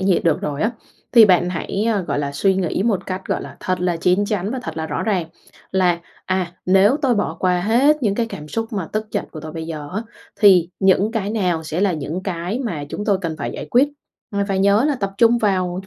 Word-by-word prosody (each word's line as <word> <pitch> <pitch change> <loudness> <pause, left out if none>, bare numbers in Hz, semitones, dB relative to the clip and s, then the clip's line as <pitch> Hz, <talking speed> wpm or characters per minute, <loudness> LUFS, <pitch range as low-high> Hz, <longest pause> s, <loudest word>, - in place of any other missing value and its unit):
nhiệt 190 -2 +2
được 165 -3 +2
rồi 145 +2 -3
á, 220 - +2 0.4
thì 230 -3 +9
bạn 180 -2 +3
hãy, 190 +3 -2
a, 205 - 0
gọi 145 -5 -2
là, 140 -1 -2
suy 190 +7 +2
nghĩ 185 0 -1
một 200 -4 0
cách, 185 0 -4
gọi - - -1
là, - - -10
thật 185 -1 -1
là 180 -1 0
chín 180 +4 +2
chắn 200 -1 -2
và 260 - -3
thật 160 - -6
là 160 0 -3
rõ - - -3
ràng 190 -6 0 0.4
là 180 -2 +2 0.2
"À, 185 -2 -1
nếu 195 +7 +5
tôi 260 -3 +3
bỏ 175 -6 -1
qua 180 -1 +2
hết 260 +9 +3
những 205 -4 +2
cái 230 +2 0
cảm 150 -9 -8
xúc 225 +4 -3
mà 190 -6 -3
tức 215 0 -2
giận - - -2
của 155 - -8
tôi 155 0 -8
bây 160 0 -5
giờ 150 -3 -6
á, 215 - -1 0.4
thì 185 -5 +6
những 195 +3 +3
cái 210 -3 -2
nào 180 -7 0
sẽ 160 +3 -3
là 200 -3 +2
những 155 +4 -4
cái 180 +3 -3
mà 165 -11 -3
chúng 205 - -5
tôi 200 -3 +2
cần 165 -4 -3
phải 140 - -3
giải - - -6
quyết?". 260 +4 +4 0.4
Và 200 0 0
phải 195 - 0
nhớ 200 +5 +4
là 295 - +1
tập 200 -6 -3
trung 235 0 +5
vào 185 -4 0
đ 190 - -17
190 Hz, 255 wpm, -20 LUFS, 170-210 Hz, 0.4 s, thì